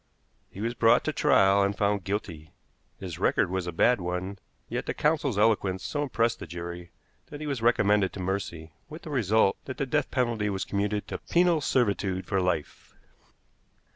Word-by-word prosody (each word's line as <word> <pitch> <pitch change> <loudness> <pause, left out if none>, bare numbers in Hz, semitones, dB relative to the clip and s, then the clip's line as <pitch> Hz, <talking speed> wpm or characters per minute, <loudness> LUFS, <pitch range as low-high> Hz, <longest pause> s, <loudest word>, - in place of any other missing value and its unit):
He 100 - -9
was 115 +2 -1
brought 115 0 +4
to 155 - -2
trial, 100 -5 +4
and 100 0 0
found 100 -2 0
guilty. 85 -6 -4 0.5
His 90 -3 -7
record 95 -1 +2
was 95 -1 -2
a - - -2
bad 115 +6 +3
one, 90 +2 -4 0.3
yet - - -4
the - - -2
counsel's 150 -7 +1
eloquence 100 -4 +2
so 145 - -2
impressed 120 -5 0
the - - -8
jury 85 +1 -7 0.4
that 145 - -9
he 155 - -5
was 140 -5 -3
recommended 105 -4 +3
to - - -7
mercy, 90 -4 -4 0.2
with 155 +2 -10
the 155 - -7
result 110 -6 +2
that 130 - -6
the 140 - -1
death 130 - 0
penalty 115 -5 0
was 95 -1 -2
commuted 105 +1 -2
to - - -5
penal 170 -2 +2
servitude 100 -8 0
for 100 -2 0
life. 90 -5 -3
100 Hz, 180 wpm, -27 LUFS, 95-120 Hz, 0.5 s, brought